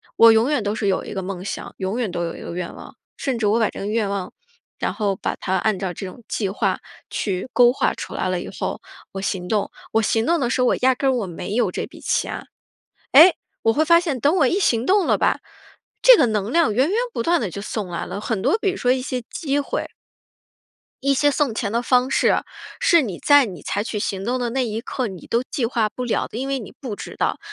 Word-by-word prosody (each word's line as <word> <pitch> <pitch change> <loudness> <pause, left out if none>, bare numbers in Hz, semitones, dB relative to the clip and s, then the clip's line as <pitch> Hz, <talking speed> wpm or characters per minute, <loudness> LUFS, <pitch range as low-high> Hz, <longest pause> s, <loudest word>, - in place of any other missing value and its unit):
我 230 0 +8
永 225 +4 +3
远 290 -7 +1
都 205 0 -1
是 215 - -1
有 190 - +1
一 - - -7
个 195 - -3
梦 185 -1 -5
想， 200 - -6
永 195 +5 -2
远 225 -6 -1
都 175 -1 -2
有 165 - -5
一 - - -10
个 - - -6
愿 180 -1 -4
望， - - -12 0.2
甚 265 -3 -2
至 220 -2 0
我 215 +3 +3
把 220 - +2
这 - - -9
个 200 - -4
愿 215 -1 0
望 200 -2 -3 0.5
然 - - -1
后 205 -4 -1
把 - - -2
它 190 - -2
按 200 +2 +1
照 185 -2 -3
这 195 - -7
种 190 +6 -10
计 200 -4 -1
划 195 - 0 0.3
去 190 +3 -3
勾 245 -1 +6
画 - - +1
出 - - -7
来 - - -1
了 - - 0
以 - - -6
后， - - -4 0.3
我 195 - -5
行 190 -2 -2
动。 210 -2 0 0.2
我 225 - +3
行 225 +1 +1
动 335 +2 +2
的 245 -4 0
时 255 - 0
候， 250 - +3
我 - - +3
压 260 0 +3
根 270 +2 +1
儿 - - +3
我 235 -6 -1
没 180 +4 -5
有 245 - +2
这 - - -3
笔 - - -14
钱。 - - -2 0.7
诶？ 325 +6 +9 0.3
我 225 - +4
会 305 - +3
发 335 +2 +6
现 315 -7 -2
等 290 +3 +3
我 295 -7 +4
一 355 - +1
行 240 - +2
动 385 +2 +3
了 - - +3
吧， - - +1 0.6
这 - - +9
个 285 - +5
能 215 -1 -1
量 335 -11 +3
源 260 +8 +2
源 410 - 0 0.2
不 - - -2
断 340 0 +2
地 200 - -2
就 200 - -6
送 210 -1 -4
来 170 - -4
了， 200 - -6
很 215 -3 -2
多 425 - +2
比 410 -3 0
如 380 - -6
说 245 - 0
一 255 0 +1
些 255 -1 -3
机 290 -4 -1
会 285 - -2 1.2
一 275 0 +3
些 290 +2 +3
送 280 -4 0
钱 215 -3 -2
的 235 +2 +1
方 250 +1 +2
式， - - +3 0.4
是 425 -10 +5
你 200 -10 -4
在 285 -2 +5
你 180 -8 -9
采 205 - -1
取 220 - -4
行 195 -2 -2
动 245 +4 -1
的 240 -1 -2
那 260 +1 0
一 220 -1 -3
刻 255 0 -3
你 190 -4 -9
都 235 - +1
计 255 0 -2
划 225 -2 0
不 250 +3 -5
了 240 - 0
的， - - -8
因 265 +2 -3
为 275 -1 -1
你 220 - -9
不 245 -6 -5
知 - - -8
道。 - - -1
230 Hz, 280 characters per minute, -22 LUFS, 200-270 Hz, 1.2 s, 诶